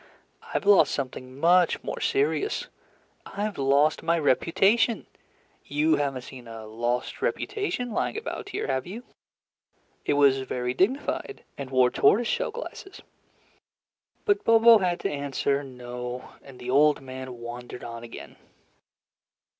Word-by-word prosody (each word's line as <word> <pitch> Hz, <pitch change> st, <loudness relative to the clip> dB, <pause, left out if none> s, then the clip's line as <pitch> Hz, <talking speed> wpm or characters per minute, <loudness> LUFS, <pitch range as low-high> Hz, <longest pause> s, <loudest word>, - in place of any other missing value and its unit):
"I've -, -, -2 dB
lost 205 Hz, -1 st, +5 dB
something 130 Hz, -1 st, -6 dB
much 175 Hz, +2 st, +4 dB
more -, -, -4 dB
serious, 415 Hz, 0 st, 0 dB, 0.6 s
I've 205 Hz, -1 st, -4 dB
lost 140 Hz, +3 st, +3 dB
my 170 Hz, +1 st, +1 dB
reputation. 195 Hz, -, +2 dB, 0.6 s
You 150 Hz, +2 st, +1 dB
have 140 Hz, -2 st, -1 dB
n't 125 Hz, -, -8 dB
seen 125 Hz, -2 st, -11 dB
a 115 Hz, -1 st, -8 dB
lost 120 Hz, +3 st, -3 dB
reputation 380 Hz, -, -2 dB
lying 220 Hz, -, -1 dB
about 440 Hz, -2 st, -5 dB
here, -, -, -3 dB
have 130 Hz, +1 st, -2 dB
you? 220 Hz, +7 st, -7 dB, 1.0 s
It -, -, +1 dB
was 140 Hz, -2 st, +4 dB
very 125 Hz, -1 st, -3 dB
dignified 260 Hz, -, -1 dB
and 140 Hz, -2 st, -7 dB
wore 130 Hz, -2 st, +4 dB
tortoise 220 Hz, +11 st, +4 dB
shell -, -, 0 dB
glasses." 445 Hz, -4 st, -9 dB, 1.2 s
But 405 Hz, -1 st, +2 dB
Bobo 230 Hz, 0 st, +7 dB
had 180 Hz, -2 st, 0 dB
to -, -, -1 dB
answer 140 Hz, 0 st, -1 dB
"No," 125 Hz, -1 st, -7 dB
and 135 Hz, -2 st, -14 dB
the 125 Hz, 0 st, -5 dB
old 150 Hz, +2 st, +4 dB
man 130 Hz, -1 st, -8 dB
wandered 120 Hz, +1 st, -8 dB
on 115 Hz, 0 st, -7 dB
again. 115 Hz, -, -10 dB
140 Hz, 135 wpm, -26 LUFS, 125-210 Hz, 1.2 s, Bobo